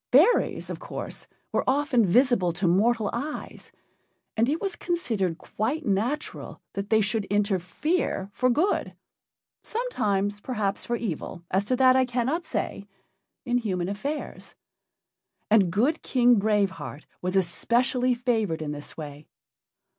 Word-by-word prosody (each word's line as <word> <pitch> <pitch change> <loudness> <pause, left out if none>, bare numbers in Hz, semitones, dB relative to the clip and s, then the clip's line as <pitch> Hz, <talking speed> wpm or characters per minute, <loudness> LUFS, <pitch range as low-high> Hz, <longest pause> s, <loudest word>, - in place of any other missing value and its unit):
Fairies, 345 - +4
of - - -5
course, - - -6 0.2
were - - +1
often 270 -3 +3
visible 235 -3 +4
to 175 +2 -1
mortal 215 +4 +3
eyes, 285 +6 -5 0.6
and 230 +3 +2
it 310 +3 0
was 390 -3 -3
considered 225 - -1
quite 275 - -3
natural 225 +9 -2
that 200 +1 -4
they 220 -1 +4
should 210 0 0
interfere 205 - 0
for 255 - +2
good 320 +11 +1 0.7
sometimes, 205 - -1
perhaps, 210 -6 -2
for 240 - 0
evil; 185 -5 -4
as 195 +2 +2
to 255 - +1
that 255 0 +5
I 260 0 +4
cannot 255 +7 -1
say 205 -5 -3 0.6
in 245 0 +2
human 185 -6 -2
affairs. 280 +10 -5 1.0
And 200 -5 +5
good 255 - +1
King 245 -3 +4
Brave 205 -2 +2
Heart 150 -3 -8 0.2
was 180 +1 -1
especially 245 +7 +2
favored 220 -10 0
in 150 - -3
this 145 0 -8
way. 150 -1 -8
225 Hz, 135 wpm, -26 LUFS, 195-255 Hz, 1.0 s, that